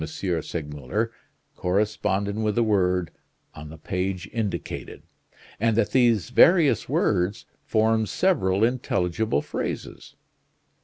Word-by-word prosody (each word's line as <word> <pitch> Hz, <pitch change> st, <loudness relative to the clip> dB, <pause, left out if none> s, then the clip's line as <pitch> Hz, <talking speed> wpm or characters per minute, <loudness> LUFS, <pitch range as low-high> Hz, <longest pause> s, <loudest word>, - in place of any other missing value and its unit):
Segmuller 80 Hz, -5 st, -3 dB, 0.4 s
corresponded 100 Hz, +1 st, 0 dB
with 110 Hz, -1 st, -1 dB
a 120 Hz, -, +4 dB
word 90 Hz, -5 st, +1 dB, 0.4 s
on 75 Hz, +1 st, -10 dB
the 80 Hz, -, -10 dB
page 90 Hz, +3 st, -3 dB
indicated, 110 Hz, -4 st, -4 dB, 0.6 s
and 115 Hz, 0 st, +1 dB
that 115 Hz, -, +1 dB
these 120 Hz, -4 st, +2 dB
various 150 Hz, -, +5 dB
words 95 Hz, 0 st, 0 dB, 0.2 s
formed 110 Hz, 0 st, +1 dB
several 100 Hz, -, +1 dB
intelligible 110 Hz, -, 0 dB
phrases. -, -, -6 dB
100 Hz, 100 wpm, -25 LUFS, 90-115 Hz, 0.6 s, various